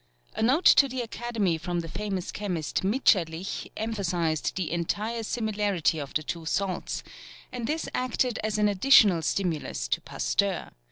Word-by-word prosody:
A -, -, -4 dB
note 265 Hz, +10 st, +2 dB
to 275 Hz, -, +7 dB
the 260 Hz, -1 st, -3 dB
Academy 225 Hz, -7 st, -1 dB
from 175 Hz, +1 st, -2 dB
the 165 Hz, -, -7 dB
famous 195 Hz, 0 st, -4 dB
chemist 180 Hz, -7 st, -2 dB
Mitscherlich 190 Hz, -5 st, +1 dB
emphasized 180 Hz, -8 st, -1 dB
the 185 Hz, -4 st, -2 dB
entire 210 Hz, +7 st, -2 dB
similarity 205 Hz, -8 st, 0 dB
of 140 Hz, -2 st, -7 dB
the 155 Hz, -, +1 dB
two 165 Hz, +1 st, -5 dB
salts, 185 Hz, +1 st, -2 dB, 0.5 s
and 240 Hz, -2 st, -4 dB
this 315 Hz, +3 st, -2 dB
acted 250 Hz, -1 st, 0 dB
as 215 Hz, -1 st, -1 dB
an 210 Hz, 0 st, +3 dB
additional 205 Hz, -3 st, +5 dB
stimulus 155 Hz, -, -2 dB
to -, -, 0 dB
Pasteur. -, -, -1 dB
195 Hz, 150 wpm, -27 LUFS, 165-225 Hz, 0.5 s, to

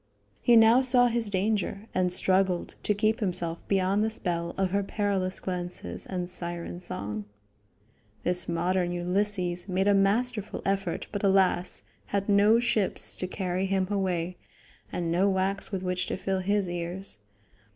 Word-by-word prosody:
He 240 Hz, -, +5 dB
now 225 Hz, +3 st, +7 dB
saw 245 Hz, -1 st, +4 dB
his 230 Hz, -2 st, 0 dB
danger, 200 Hz, 0 st, -1 dB
and 180 Hz, -1 st, +1 dB
struggled 185 Hz, 0 st, +1 dB
to 210 Hz, -, 0 dB
keep 215 Hz, +2 st, +1 dB
himself 175 Hz, -4 st, -1 dB
beyond 195 Hz, +1 st, +2 dB
the 220 Hz, -, +1 dB
spell 170 Hz, -5 st, -2 dB
of 190 Hz, -1 st, 0 dB
her 200 Hz, +1 st, +1 dB
perilous 195 Hz, -2 st, -1 dB
glances 175 Hz, -, -4 dB
and 180 Hz, -2 st, -3 dB
siren 175 Hz, -1 st, -3 dB
song. 105 Hz, -, -4 dB, 1.0 s
This 180 Hz, 0 st, +2 dB
modern 175 Hz, +1 st, 0 dB
Ulysses 180 Hz, 0 st, -1 dB
made 190 Hz, +2 st, +1 dB
a 205 Hz, -, +5 dB
masterful 210 Hz, +2 st, +1 dB
effort, 195 Hz, 0 st, -1 dB
but 205 Hz, -, -3 dB
alas! 190 Hz, -2 st, +2 dB, 0.2 s
had 200 Hz, -1 st, -1 dB
no 205 Hz, +2 st, +5 dB
ships 220 Hz, -5 st, +1 dB
to 185 Hz, -, -3 dB
carry 185 Hz, 0 st, -2 dB
him 190 Hz, -1 st, 0 dB
away, 180 Hz, -3 st, -1 dB, 0.5 s
and 170 Hz, -2 st, -2 dB
no 185 Hz, +4 st, +3 dB
wax 195 Hz, +1 st, -1 dB
with 190 Hz, -2 st, -3 dB
which 180 Hz, 0 st, -1 dB
to -, -, -3 dB
fill 190 Hz, 0 st, -1 dB
his 200 Hz, +1 st, 0 dB
ears. 175 Hz, -, -5 dB
190 Hz, 150 wpm, -27 LUFS, 180-200 Hz, 1.0 s, now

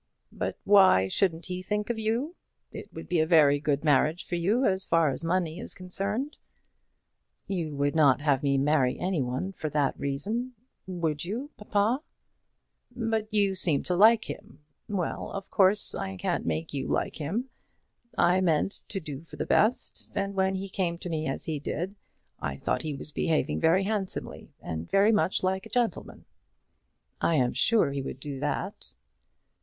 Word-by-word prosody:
"But -, -, -3 dB
why 190 Hz, -, +6 dB
shouldn't 165 Hz, -, 0 dB
he 180 Hz, 0 st, -4 dB
think 210 Hz, +4 st, -2 dB
of 230 Hz, -, -4 dB
you? 235 Hz, +10 st, -1 dB, 0.4 s
It -, -, -9 dB
would -, -, -9 dB
be 175 Hz, -, +1 dB
a 160 Hz, -, +2 dB
very 150 Hz, -4 st, +5 dB
good 145 Hz, -1 st, 0 dB
marriage 155 Hz, +3 st, +2 dB
for -, -, -8 dB
you, 200 Hz, +10 st, +2 dB
as 190 Hz, 0 st, +2 dB
far 165 Hz, -3 st, +3 dB
as 135 Hz, -, -4 dB
money 170 Hz, -1 st, 0 dB
is -, -, -6 dB
concerned." 200 Hz, +9 st, -3 dB, 1.1 s
"You 170 Hz, -6 st, -3 dB
would 145 Hz, 0 st, +1 dB
not 145 Hz, -3 st, +5 dB
have 145 Hz, -3 st, +2 dB
me 140 Hz, -2 st, +2 dB
marry 135 Hz, -2 st, +2 dB
any 180 Hz, -4 st, 0 dB
one 130 Hz, +10 st, -2 dB
for 155 Hz, -5 st, -4 dB
that 145 Hz, -2 st, +1 dB
reason; 215 Hz, -, -2 dB, 0.3 s
would 165 Hz, -5 st, -2 dB
you, 235 Hz, -, -4 dB
papa?" 210 Hz, +5 st, 0 dB, 0.9 s
"But 225 Hz, -3 st, -2 dB
you 200 Hz, -2 st, +2 dB
seemed 170 Hz, -6 st, +2 dB
to 180 Hz, -, 0 dB
like 220 Hz, +4 st, +6 dB
him. 205 Hz, -7 st, -9 dB, 0.2 s
Well; 190 Hz, -5 st, -2 dB
of 195 Hz, -1 st, -6 dB
course 200 Hz, 0 st, +3 dB
I 95 Hz, 0 st, -4 dB
can't -, -, -2 dB
make 80 Hz, -, -2 dB
you 140 Hz, -, -2 dB
like -, -, -1 dB
him. 205 Hz, -, -3 dB, 0.7 s
I 180 Hz, +2 st, +4 dB
meant 170 Hz, +1 st, +2 dB, 0.2 s
to 195 Hz, -, -3 dB
do 150 Hz, -5 st, -7 dB
for 165 Hz, -, -13 dB
the -, -, -3 dB
best; 240 Hz, +4 st, +1 dB
and 200 Hz, 0 st, -1 dB
when 190 Hz, 0 st, +1 dB
he 190 Hz, +1 st, -4 dB
came 180 Hz, -3 st, -1 dB
to 175 Hz, -, -6 dB
me 155 Hz, -1 st, -2 dB
as 135 Hz, -, -3 dB
he 155 Hz, -2 st, -2 dB
did, 175 Hz, +6 st, -3 dB, 0.5 s
I -, -, -3 dB
thought -, -, -1 dB
he 155 Hz, -3 st, -3 dB
was 140 Hz, -, -9 dB
behaving 155 Hz, +1 st, 0 dB
very 170 Hz, +4 st, +4 dB
handsomely, 200 Hz, -2 st, -3 dB
and 80 Hz, +1 st, -5 dB
very 200 Hz, +3 st, +4 dB
much 205 Hz, -4 st, +1 dB
like 190 Hz, +1 st, 0 dB
a -, -, -21 dB
gentleman." 240 Hz, -2 st, -2 dB, 1.0 s
"I 165 Hz, -, +2 dB
am 125 Hz, -4 st, +2 dB
sure 225 Hz, -11 st, +3 dB
he 140 Hz, 0 st, -2 dB
would 135 Hz, -, -6 dB
do 140 Hz, -3 st, -6 dB
that." 100 Hz, -, -4 dB
180 Hz, 175 wpm, -28 LUFS, 150-205 Hz, 1.1 s, why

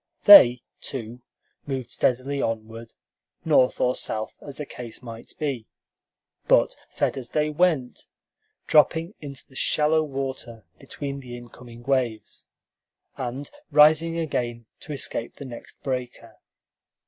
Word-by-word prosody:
They, 125 Hz, -12 st, +9 dB, 0.2 s
too, 120 Hz, -2 st, -7 dB, 0.5 s
moved 130 Hz, -3 st, -4 dB
steadily 135 Hz, +3 st, 0 dB
onward, 115 Hz, 0 st, -5 dB, 0.5 s
north 145 Hz, -5 st, +3 dB
or 125 Hz, -, +2 dB
south 110 Hz, -3 st, -4 dB
as 140 Hz, -2 st, -10 dB
the 150 Hz, -, -5 dB
case 120 Hz, -2 st, -8 dB
might 115 Hz, -1 st, -9 dB
be, 135 Hz, -7 st, -3 dB, 0.8 s
but -, -, +4 dB
fed -, -, -1 dB
as 120 Hz, -, -8 dB
they 150 Hz, 0 st, 0 dB
went, 150 Hz, -6 st, 0 dB, 0.6 s
dropping 160 Hz, +4 st, +3 dB
into 140 Hz, -3 st, -9 dB
the -, -, -21 dB
shallow 150 Hz, +4 st, +2 dB
water 130 Hz, -, -5 dB
between 140 Hz, -1 st, -6 dB
the 125 Hz, -2 st, -9 dB
incoming 120 Hz, 0 st, -13 dB
waves, 125 Hz, -4 st, -2 dB, 0.7 s
and 130 Hz, +3 st, -5 dB, 0.2 s
rising 155 Hz, +2 st, +5 dB
again 120 Hz, -7 st, -3 dB
to -, -, -9 dB
escape 130 Hz, -4 st, -4 dB
the 140 Hz, -, -9 dB
next 120 Hz, -3 st, -11 dB
breaker. 125 Hz, -3 st, -5 dB
130 Hz, 125 wpm, -25 LUFS, 120-150 Hz, 0.8 s, They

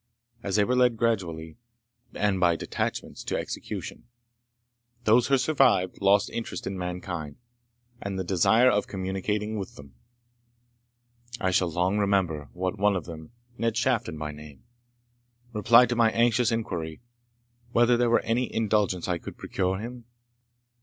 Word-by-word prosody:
As 100 Hz, -, -2 dB
they 105 Hz, -, +4 dB
were 125 Hz, +5 st, +1 dB
led 125 Hz, -2 st, +3 dB
gradually, 90 Hz, -9 st, -2 dB, 0.6 s
and 100 Hz, -2 st, +1 dB
by 85 Hz, -2 st, +3 dB
detachments, -, -, -4 dB
to -, -, -1 dB
execution, -, -, -6 dB, 1.0 s
those 115 Hz, +2 st, +4 dB
who 135 Hz, -, +4 dB
survived 130 Hz, -12 st, +2 dB
lost 100 Hz, +1 st, +3 dB
interest 115 Hz, -, -5 dB
in 95 Hz, -, -3 dB
mankind, 90 Hz, -4 st, -5 dB, 0.7 s
and 100 Hz, -1 st, -4 dB
the 95 Hz, -, -2 dB
desire 110 Hz, +7 st, +4 dB
of 105 Hz, -2 st, 0 dB
communicating 105 Hz, +3 st, -3 dB
with 95 Hz, -, -7 dB
them. 70 Hz, -2 st, -13 dB, 1.5 s
I 95 Hz, -, 0 dB
shall 90 Hz, -1 st, +2 dB
long 90 Hz, +5 st, +1 dB
remember 90 Hz, -8 st, 0 dB
what 95 Hz, +4 st, -3 dB
one 105 Hz, 0 st, +3 dB
of 90 Hz, -5 st, -3 dB
them, 80 Hz, -2 st, -9 dB, 0.3 s
Ned 115 Hz, -1 st, 0 dB
Shafton 120 Hz, -9 st, 0 dB
by 75 Hz, 0 st, -4 dB
name, 75 Hz, -2 st, -13 dB, 0.9 s
replied 115 Hz, +3 st, +5 dB
to 120 Hz, -, 0 dB
my 115 Hz, -1 st, +4 dB
anxious 120 Hz, +1 st, +2 dB
inquiry, 90 Hz, -7 st, -4 dB, 0.7 s
whether 120 Hz, 0 st, +4 dB
there 120 Hz, 0 st, +2 dB
was 120 Hz, -, +4 dB
any 120 Hz, +2 st, 0 dB
indulgence 105 Hz, -5 st, 0 dB
I 90 Hz, -2 st, -1 dB
could -, -, -9 dB
procure 95 Hz, 0 st, -1 dB
him? 120 Hz, +3 st, -8 dB
100 Hz, 145 wpm, -26 LUFS, 90-115 Hz, 1.5 s, replied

